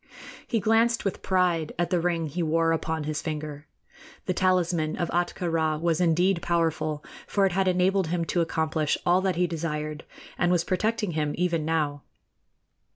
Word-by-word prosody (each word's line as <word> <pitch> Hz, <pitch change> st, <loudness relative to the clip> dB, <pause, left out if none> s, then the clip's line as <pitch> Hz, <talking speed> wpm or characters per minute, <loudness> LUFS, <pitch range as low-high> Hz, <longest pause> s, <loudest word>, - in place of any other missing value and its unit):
He 230 Hz, -, +1 dB
glanced 225 Hz, +2 st, +2 dB
with 195 Hz, -, -2 dB
pride 180 Hz, -4 st, +1 dB
at 175 Hz, +2 st, -1 dB
the 180 Hz, -, +3 dB
ring 170 Hz, -1 st, 0 dB
he 155 Hz, +4 st, -3 dB
wore 165 Hz, 0 st, +2 dB
upon 160 Hz, -1 st, -1 dB
his 150 Hz, 0 st, -3 dB
finger. 150 Hz, -2 st, -5 dB, 0.6 s
The 185 Hz, -, 0 dB
talisman 175 Hz, -4 st, +1 dB
of 170 Hz, -, -2 dB
Ahtka 175 Hz, +1 st, -1 dB
Rā 160 Hz, -2 st, 0 dB
was 170 Hz, +1 st, +1 dB
indeed 175 Hz, +2 st, +2 dB
powerful, 160 Hz, -3 st, -1 dB, 0.2 s
for 200 Hz, -1 st, +2 dB
it 190 Hz, -, +2 dB
had 190 Hz, +1 st, +1 dB
enabled 185 Hz, 0 st, +2 dB
him 170 Hz, 0 st, -1 dB
to 175 Hz, -, 0 dB
accomplish 160 Hz, -2 st, 0 dB
all 180 Hz, +1 st, +4 dB
that 190 Hz, -1 st, 0 dB
he 180 Hz, +1 st, +2 dB
desired, 155 Hz, -2 st, -4 dB, 0.4 s
and 175 Hz, -, +3 dB
was 175 Hz, -2 st, +2 dB
protecting 210 Hz, +2 st, 0 dB
him 150 Hz, -2 st, -1 dB
even 170 Hz, -3 st, 0 dB
now. 150 Hz, -3 st, 0 dB
170 Hz, 170 wpm, -26 LUFS, 155-180 Hz, 0.6 s, all